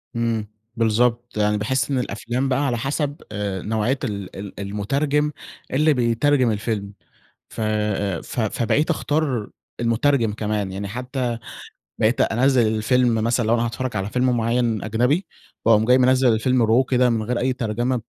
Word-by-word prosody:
إمم، 115 -2 -1 0.3
بالضبط. 120 +1 +1
يعني 105 0 +2
باحس 120 +5 -1
إن 135 - +1
الأفلام 125 +2 -2
بقى 130 0 +1
على 120 -2 0
حسب 145 +3 -2
آآ 100 -3 -3
نوعية 110 +6 0
ال 100 -6 -4
ال 100 0 -8
المترجم 140 +10 0 0.4
اللي 155 +3 +4
بيترجم 125 +1 +2
الفيلم، 105 -1 -3 0.6
ف - - -8
آآ 105 -4 -1
ف - - -5
فبقيت 115 - 0
أختار 145 -8 -1 0.3
المترجم 120 0 +2
كمان، 105 -2 -2
يعني 100 +1 -4
حتى 125 +1 -3 0.6
بقيت 110 +3 +2
أنزِّل 125 0 +3
الفيلم 120 +2 +2
مثلًا 115 +1 +1
لو 115 - +3
أنا 120 0 +1
هاتفرج 115 0 -4
على 95 +1 -2
فيلم 125 0 +1
مُعيّن 115 -1 0
أجنبي، 125 - +1 0.4
وأقوم 110 -1 +5
جاي 125 +3 +5
منزِّل 130 -1 +4
الفيلم 120 +2 +2
raw 115 +4 +4
كده 125 -1 +3
من 115 -2 0
غير 120 +3 -2
أي 130 +2 +1
ترجمة، 120 +1 -1
120 Hz, 155 wpm, -22 LUFS, 110-130 Hz, 0.6 s, وأقوم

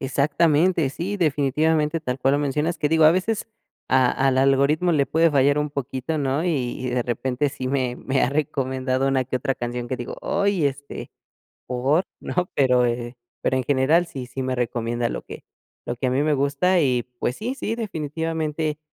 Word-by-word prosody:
Exactamente. 150 +4 +2
Sí, 185 +8 -4
definitivamente 155 0 +1
tal 125 -4 -3
cual 135 +1 +2
lo - - +2
mencionas, 150 +4 -1
que 150 - +1
digo 160 0 +4
a 155 - +9
veces 195 +5 0 0.4
a 130 -2 +4 0.2
al 130 -1 +2
algoritmo 140 +6 +3
le 140 -3 +2
puede 165 +1 +3
fallar 140 0 +3
un 150 -1 -1
poquito 140 +2 -3
¿no? 140 +3 0
Y 135 -8 -1
y - - -1
de 125 0 0
repente 125 +4 -1
sí 130 -2 -5
me 130 -2 -1
me 135 0 -1
ha - - +3
recomendado 130 -2 -1
una 130 -1 +1
que 130 0 -2
otra 135 +1 -1
canción 120 0 -4
que 130 - -2
digo, 120 0 -6
"¡Oy!, 200 -5 +1
este, 140 +1 -6 0.6
¿por?", 135 +8 +1 0.2
¿no? 180 0 -2
Pero 125 -3 +3
eh 120 +1 -3 0.3
pero 130 - +1
en 130 - -2
general 145 +6 +3
sí 130 -6 -7
sí 130 +1 -5
me 130 0 -1
recomienda 120 -1 -1
lo - - -4
que - - -10 0.4
lo 120 - -3
que 130 - -2
a - - +1
mí 135 +3 +1
me 155 0 +2
gusta 145 +6 +2
y, 125 -5 +2 0.2
pues, 125 - -1
sí, 240 +5 -3
sí, 225 -4 -3
definitivamente 160 -5 -3
140 Hz, 195 wpm, -23 LUFS, 130-160 Hz, 0.6 s, a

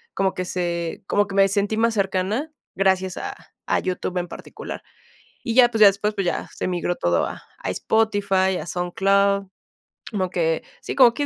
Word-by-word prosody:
como 190 -1 +1
que 185 - -3
se 170 -2 -3
como 205 0 +2
que 195 - -6
me 195 0 +6
sentí 205 +2 0
más 230 +1 +2
cercana 195 +9 -1 0.2
gracias 190 -1 +1
a - - -5 0.3
a - - +2
YouTube 185 0 -3
en 175 - -3
particular. - - -8 0.7
Y 225 - +1
ya, 245 -1 +7
pues, 225 - -2
ya 210 - +10
después, 200 +2 +3
pues, 195 -3 -1
ya 175 - -1
se - - -3
migró 175 0 -1
todo 85 0 +1
a - - -7 0.2
a - - -3
Spotify, 200 -4 +1
a 155 - -7
SoundCloud, 195 +3 +1 0.7
como 190 -3 -1
que 165 -3 0 0.2
sí, - - -5
como 250 -3 +7
que 290 +3 -1
195 Hz, 185 wpm, -23 LUFS, 180-205 Hz, 0.7 s, ya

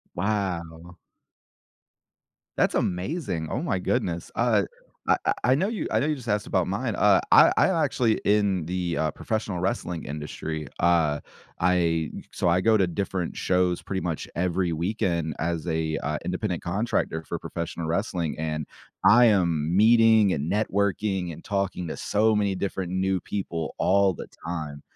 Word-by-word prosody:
Wow. 90 -4 -3 1.6
That's - - +2
amazing, 90 - -2
oh 125 - -2
my 95 - 0
goodness. 85 -1 -2
Uh, - - +2 0.4
I - - +5 0.3
I 130 +2 +5
know 185 +8 +1
you 225 -3 -3
I - - +2
know 145 - +1
you 155 - +1
just 125 -5 -10
asked 105 0 0
about - - +1
mine, - - -2
uh, - - +5
I - - +8
I'm - - +4
actually 115 -3 +1
in 100 -5 +2
the, 90 -1 -2
uh, 80 -1 +1
professional 105 -4 -3
wrestling 90 -3 -2
industry. 75 +1 -5
Uh, 80 -4 +2 0.4
I 85 -3 +1 0.2
So 90 - 0
I 90 +2 +3
go 110 +3 +4
to 95 - +3
different 90 0 -3
shows 90 -1 +1
pretty 95 -1 -3
much 85 -3 -3
every 90 0 0
weekend 85 -3 -1
as 85 0 -2
a, 80 -1 -1
uh, 75 +1 -2
independent 90 -1 -2
contractor 85 -3 -1
for - - -5
professional 85 0 -5
wrestling, 85 -2 -1
and 75 -1 -3 0.4
I 120 +5 +7
am 85 -6 +2
meeting 110 -2 +6
and 75 +3 -2
networking 100 -3 0
and 80 - -11
talking 95 -4 -2
to - - -5
so 110 +1 +2
many 100 -2 +1
different 95 -1 -3
new 95 0 0
people 85 -5 -4
all 100 0 +3
the - - -8 0.2
time, 75 -4 -5
90 Hz, 155 wpm, -26 LUFS, 80-100 Hz, 1.6 s, I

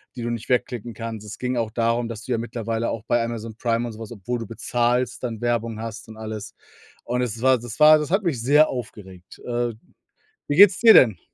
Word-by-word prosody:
die 125 - -6
du 120 - -2
nicht 115 -1 -6
wegklicken 120 -2 -1
kannst. 110 -1 -7
Es 105 - -8
ging 125 0 -2
auch 115 -2 -1
darum, 115 +1 0
dass 115 -1 -7
du 130 - -6
ja - - +1
mittlerweile 115 -1 -3
auch 110 - -5
bei 120 -1 +2
Amazon 115 -1 -5
Prime 115 0 0
und 115 - -7
so 110 - -12
was, 115 -1 -8
obwohl 120 +3 -4
du 115 - -6
bezahlst, 120 +2 -1
dann 115 -3 -4
Werbung 115 -2 -1
hast 115 -1 -7
und 110 - -11
alles. 110 +1 -7 0.5
Und 125 +1 -1
es 115 -2 -3
war 130 0 +4
das 120 +1 -9
war 155 0 +8
das 150 - -4
hat 195 +3 +2
mich 155 -10 -1
sehr 150 +5 +4
aufgeregt. 95 -7 -9
Äh, 120 -1 -2 0.8
wie 145 - 0
geht's 200 +1 +7
dir 225 -1 +8
denn? 110 -9 +6
115 Hz, 230 wpm, -23 LUFS, 110-125 Hz, 0.8 s, war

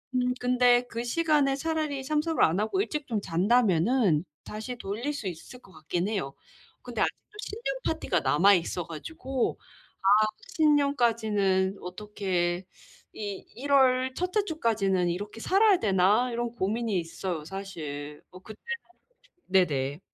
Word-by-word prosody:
음 250 0 +2
근데 245 0 +4
그 230 +1 -4
시간에 290 +1 +2
차라리 305 -2 -2
참석을 305 +3 +1
안 165 +4 +3
하고 220 - 0
일찍 300 -7 -3
좀 220 -4 -1
잔다면은 195 - +2 0.2
다시 220 +4 -6
돌릴 235 +7 -3
수 260 -8 -5
있을 180 +8 -8
것 195 - -19
같긴 165 +4 -2
해요. 190 -11 -2 0.5
근데 - - -5
아직도 420 - -3
신년 430 +3 -4
파티가 315 - 0
남아 150 +9 +5
있어 175 -1 -2
가지고 260 - -3 0.4
'아 205 +3 +5 0.3
신년까지는 225 - +2
어떻게 180 -2 -2 0.5
이 205 -2 -6
1 280 +3 -4
월 260 -1 +4
1 360 +1 -2
째 425 +1 +2
주까지는 205 - +1
이렇게 205 +5 -5
살아야 395 - +4
되나?' 205 +4 +3
이런 240 0 -2
고민이 220 0 -1
있어요 165 0 -4
사실. 155 -6 -7
뭐 185 - -12
그때는 215 +2 -12 0.6
솔직히 360 -8 -33
네네. 145 -6 +1
215 Hz, 285 characters per minute, -28 LUFS, 185-265 Hz, 0.6 s, 남아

